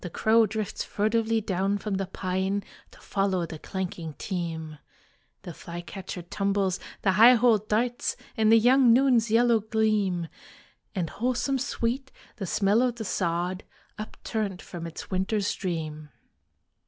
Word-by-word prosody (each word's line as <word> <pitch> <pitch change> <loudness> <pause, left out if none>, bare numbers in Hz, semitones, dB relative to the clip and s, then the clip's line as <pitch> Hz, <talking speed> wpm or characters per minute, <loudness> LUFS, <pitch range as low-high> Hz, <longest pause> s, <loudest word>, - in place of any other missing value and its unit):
The 180 - -4
crow 220 +5 +3
drifts 215 -1 -3
furtively 220 +1 0
down 195 0 0
from 200 -1 -3
the 195 -1 -2
pine 190 +2 -2 0.3
To - - -18
follow 195 -3 0
the 160 -1 -8
clanking 175 -4 -5
team. 160 -5 -4 0.6
The 175 - -7
flycatcher 175 +2 -7
tumbles, 195 +1 0 0.2
the 190 - +4
high 230 +6 +8
hole 230 -2 +4
darts 230 +4 -1 0.2
In 220 -2 +3
the 225 - +8
young 245 +1 +6
noon's 245 -3 +4
yellow 230 +1 +4
gleam; 215 -5 0 0.7
And 175 -4 -2
wholesome 255 +3 0
sweet 260 +1 -2 0.3
the 195 -5 -4
smell 205 +5 +2
of 250 -2 +1
the 225 -2 -6
sod 175 +1 -1 0.4
Upturned 215 -2 -4
from 170 -3 -7
its 165 - -9
winter's 195 +2 0
dream. 155 -4 -4
200 Hz, 140 wpm, -27 LUFS, 180-225 Hz, 0.7 s, high